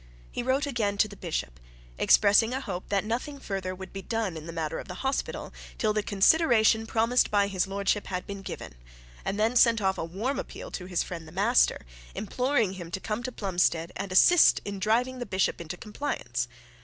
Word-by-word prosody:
He -, -, -3 dB
wrote 260 Hz, +4 st, +1 dB
again 220 Hz, -7 st, -1 dB
to 215 Hz, -, +4 dB
the 205 Hz, -, -11 dB
bishop, 110 Hz, -, -4 dB, 0.4 s
expressing 220 Hz, +4 st, +5 dB
a -, -, -1 dB
hope 190 Hz, -9 st, -6 dB
that 200 Hz, 0 st, +1 dB
nothing 255 Hz, +6 st, -3 dB
further 190 Hz, -6 st, -4 dB
would 190 Hz, 0 st, -10 dB
be 195 Hz, -, -5 dB
done 215 Hz, -2 st, -2 dB
in 160 Hz, 0 st, -8 dB
the -, -, -5 dB
matter 160 Hz, -1 st, -3 dB
of -, -, -8 dB
the 180 Hz, -, -7 dB
hospital, 270 Hz, +1 st, -2 dB, 0.2 s
till 215 Hz, -2 st, +1 dB
the 215 Hz, -, +1 dB
consideration 220 Hz, -, +4 dB
promised 230 Hz, +3 st, +2 dB
by 205 Hz, -1 st, +3 dB
his 195 Hz, -2 st, -1 dB
lordship 200 Hz, +1 st, -1 dB
had 180 Hz, -1 st, -3 dB
been 200 Hz, -1 st, -7 dB
given, 195 Hz, -, -7 dB, 0.5 s
and 200 Hz, -, -2 dB
then 225 Hz, +3 st, +2 dB
sent 235 Hz, -2 st, +5 dB
off 190 Hz, -2 st, 0 dB
a -, -, -1 dB
warm 205 Hz, +12 st, -2 dB
appeal -, -, -7 dB
to 180 Hz, -, -6 dB
his 180 Hz, -2 st, 0 dB
friend 165 Hz, -3 st, -7 dB
the -, -, -12 dB
master, -, -, +2 dB, 0.3 s
imploring 240 Hz, -1 st, 0 dB
him 175 Hz, -3 st, -8 dB
to 185 Hz, -, -4 dB
come 215 Hz, +3 st, -3 dB
to 255 Hz, +1 st, -4 dB
Plumstead 175 Hz, -5 st, 0 dB
and 195 Hz, -1 st, -5 dB
assist 340 Hz, -, +6 dB
in 200 Hz, -1 st, -5 dB
driving 245 Hz, +6 st, +1 dB
the 245 Hz, -, -3 dB
bishop 190 Hz, -2 st, 0 dB
into 170 Hz, +1 st, -6 dB
compliance. 190 Hz, -, -3 dB
200 Hz, 205 wpm, -28 LUFS, 185-230 Hz, 0.5 s, assist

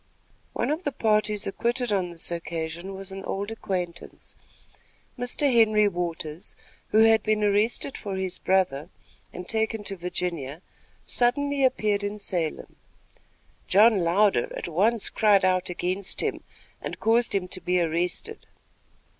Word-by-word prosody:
One -, -, -1 dB
of 310 Hz, +3 st, -1 dB
the 290 Hz, -, -2 dB
parties 215 Hz, -3 st, +1 dB
acquitted 240 Hz, +4 st, -1 dB
on 190 Hz, -3 st, 0 dB
this 170 Hz, 0 st, -3 dB
occasion 170 Hz, +2 st, -4 dB
was 195 Hz, 0 st, -8 dB
an 195 Hz, 0 st, -7 dB
old 200 Hz, +3 st, -3 dB
acquaintance. 180 Hz, -6 st, -5 dB, 0.8 s
Mr. 250 Hz, +3 st, 0 dB
Henry 215 Hz, -2 st, +5 dB
Waters, 170 Hz, -3 st, -4 dB, 0.3 s
who 220 Hz, +1 st, +5 dB
had 225 Hz, -1 st, +5 dB
been 215 Hz, 0 st, 0 dB
arrested 210 Hz, +6 st, +1 dB
for 200 Hz, -2 st, -5 dB
his 190 Hz, -1 st, -3 dB
brother 180 Hz, -5 st, +1 dB, 0.4 s
and 180 Hz, 0 st, -8 dB
taken 220 Hz, -1 st, -1 dB
to 200 Hz, -1 st, -4 dB
Virginia, 175 Hz, -4 st, -4 dB, 0.4 s
suddenly 280 Hz, +3 st, +1 dB
appeared 215 Hz, -5 st, +1 dB
in 205 Hz, +1 st, -3 dB
Salem. 175 Hz, -6 st, -3 dB, 0.9 s
John 215 Hz, +2 st, +5 dB
Louder, 180 Hz, -4 st, +2 dB
at -, -, -5 dB
once 200 Hz, +6 st, +2 dB
cried 205 Hz, -3 st, +4 dB
out 185 Hz, -1 st, +1 dB
against 185 Hz, +2 st, -2 dB
him -, -, -2 dB, 0.4 s
and -, -, -6 dB
caused 230 Hz, -1 st, +2 dB
him 185 Hz, -2 st, 0 dB
to 185 Hz, -, -1 dB
be 180 Hz, 0 st, +1 dB
arrested. 175 Hz, -, -2 dB
195 Hz, 140 wpm, -26 LUFS, 180-220 Hz, 0.9 s, Henry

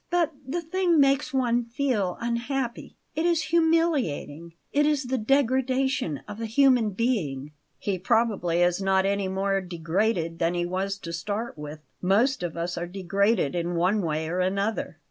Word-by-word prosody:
But 340 Hz, -3 st, +1 dB
the 340 Hz, +5 st, -2 dB
thing 345 Hz, 0 st, +2 dB
makes 275 Hz, +1 st, +3 dB
one 245 Hz, -3 st, +1 dB
feel 230 Hz, -6 st, -1 dB
unhappy. 240 Hz, +1 st, -3 dB, 0.2 s
It 315 Hz, -, 0 dB
is 335 Hz, -2 st, +2 dB
humiliating; 300 Hz, -, +1 dB, 0.2 s
it 295 Hz, +1 st, +3 dB
is 295 Hz, -2 st, +1 dB
the 255 Hz, 0 st, -1 dB
degradation 260 Hz, -, +1 dB
of 210 Hz, +2 st, -7 dB
a 225 Hz, -, -2 dB
human 250 Hz, -1 st, +4 dB
being." 185 Hz, -, -1 dB, 0.3 s
"He 195 Hz, -3 st, -2 dB
probably 185 Hz, -4 st, +1 dB
is 175 Hz, +2 st, +1 dB
not 190 Hz, 0 st, +2 dB
any 200 Hz, 0 st, 0 dB
more 195 Hz, +1 st, 0 dB
degraded 170 Hz, 0 st, -1 dB
than 170 Hz, +1 st, +1 dB
he 175 Hz, 0 st, 0 dB
was 190 Hz, +2 st, -2 dB
to 170 Hz, -4 st, -7 dB
start 210 Hz, +7 st, -3 dB
with. 150 Hz, 0 st, -8 dB, 0.2 s
Most 215 Hz, +8 st, +2 dB
of 170 Hz, -2 st, -4 dB
us 170 Hz, +1 st, -2 dB
are 175 Hz, -, -4 dB
degraded 195 Hz, -1 st, +1 dB
in 175 Hz, 0 st, -2 dB
one 185 Hz, +5 st, +2 dB
way 160 Hz, -2 st, -2 dB
or 175 Hz, +3 st, -2 dB
another." 195 Hz, -1 st, -1 dB
200 Hz, 165 wpm, -26 LUFS, 175-260 Hz, 0.3 s, human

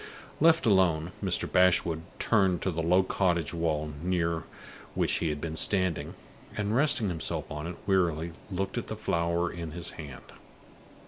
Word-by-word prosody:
Left 165 Hz, +1 st, +5 dB
alone, 90 Hz, -5 st, +3 dB
Mr. -, -, +2 dB
Bashwood 90 Hz, -3 st, +3 dB, 0.2 s
turned 95 Hz, -6 st, +2 dB
to 95 Hz, -, 0 dB
the 85 Hz, 0 st, -2 dB
low 90 Hz, +3 st, +4 dB
cottage 85 Hz, -4 st, 0 dB
wall 75 Hz, -2 st, -1 dB
near 85 Hz, -2 st, -1 dB, 0.5 s
which -, -, +1 dB
he 80 Hz, -, 0 dB
had 75 Hz, -1 st, -3 dB
been 80 Hz, +1 st, -4 dB
standing, 95 Hz, -1 st, +1 dB, 0.4 s
and, 105 Hz, +1 st, -1 dB
resting 130 Hz, -6 st, +3 dB
himself 80 Hz, -2 st, -4 dB
on 75 Hz, +1 st, -4 dB
it 85 Hz, -, -6 dB
wearily, 85 Hz, -4 st, +1 dB, 0.2 s
looked 95 Hz, 0 st, -2 dB
at -, -, -7 dB
the -, -, -4 dB
flower 85 Hz, +1 st, 0 dB
in 85 Hz, -3 st, -6 dB
his 85 Hz, -1 st, -3 dB
hand. 70 Hz, -5 st, -9 dB
85 Hz, 155 wpm, -29 LUFS, 80-95 Hz, 0.5 s, Left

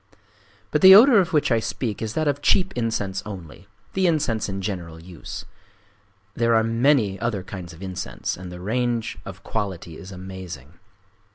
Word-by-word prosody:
But -, -, +1 dB
the 190 Hz, 0 st, +11 dB
odor 230 Hz, +1 st, +8 dB
of 185 Hz, -1 st, +1 dB
which 150 Hz, -4 st, +2 dB
I 115 Hz, -, +4 dB
speak 110 Hz, -1 st, -3 dB
is 110 Hz, -1 st, -3 dB
that 155 Hz, -1 st, 0 dB
of 145 Hz, 0 st, 0 dB
cheap 190 Hz, +3 st, +3 dB
incense 110 Hz, -5 st, -2 dB
only,—the 95 Hz, -, -5 dB
incense 135 Hz, -11 st, 0 dB
in 95 Hz, 0 st, -4 dB
general 90 Hz, -5 st, -5 dB
use. 85 Hz, 0 st, -9 dB, 0.9 s
There 115 Hz, +1 st, +2 dB
are 110 Hz, -, +4 dB
many 115 Hz, -3 st, +2 dB
other 110 Hz, -5 st, -2 dB
kinds 90 Hz, -2 st, -8 dB
of 85 Hz, +3 st, -12 dB
incense; 95 Hz, -1 st, -4 dB
and 90 Hz, 0 st, -9 dB
the 90 Hz, -, -8 dB
range 115 Hz, +4 st, -1 dB
of -, -, -9 dB
quality 95 Hz, -6 st, -4 dB
is 95 Hz, +1 st, -10 dB
amazing. 90 Hz, -6 st, -9 dB
105 Hz, 165 wpm, -23 LUFS, 95-125 Hz, 0.9 s, the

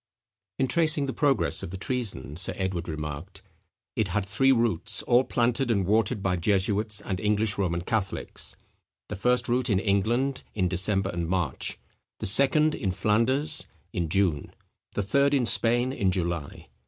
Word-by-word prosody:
In 135 Hz, -, +1 dB
tracing 155 Hz, +1 st, +2 dB
the 135 Hz, -, -3 dB
progress 140 Hz, -3 st, +1 dB
of -, -, -6 dB
the 95 Hz, -, -6 dB
treason, 95 Hz, -, -3 dB
Sir 90 Hz, +3 st, -3 dB
Edward 95 Hz, -3 st, -3 dB
remarked, 75 Hz, +3 st, -6 dB, 0.5 s
"It 110 Hz, -, 0 dB
had 95 Hz, +2 st, -1 dB
three 120 Hz, +8 st, +2 dB
roots, 115 Hz, -9 st, +3 dB
all 120 Hz, +2 st, +4 dB
planted 120 Hz, +1 st, 0 dB
and 100 Hz, -5 st, +1 dB
watered 105 Hz, +1 st, +1 dB
by 90 Hz, -2 st, +1 dB
jesuits 105 Hz, +3 st, 0 dB
and 95 Hz, -2 st, -4 dB
English 105 Hz, 0 st, 0 dB
Roman 85 Hz, -3 st, 0 dB
Catholics: 100 Hz, +1 st, -3 dB, 0.5 s
the 105 Hz, -, -4 dB
first 125 Hz, +5 st, +1 dB
root 125 Hz, +1 st, +1 dB
in 100 Hz, -, +3 dB
England, 115 Hz, +7 st, 0 dB
in 95 Hz, -3 st, +1 dB
December 95 Hz, +2 st, +2 dB
and 85 Hz, -1 st, -3 dB
March; 90 Hz, -7 st, -1 dB, 0.4 s
the -, -, -5 dB
second 140 Hz, +8 st, +3 dB
in 100 Hz, -, -2 dB
Flanders, 115 Hz, +9 st, +1 dB, 0.3 s
in 85 Hz, -2 st, -2 dB
June; 90 Hz, -5 st, 0 dB, 0.4 s
the 105 Hz, -, -1 dB
third 140 Hz, +7 st, +2 dB
in 130 Hz, -3 st, +2 dB
Spain, 120 Hz, +3 st, +2 dB
in 100 Hz, -8 st, 0 dB
July. 85 Hz, -5 st, -3 dB
105 Hz, 160 wpm, -26 LUFS, 95-125 Hz, 0.5 s, all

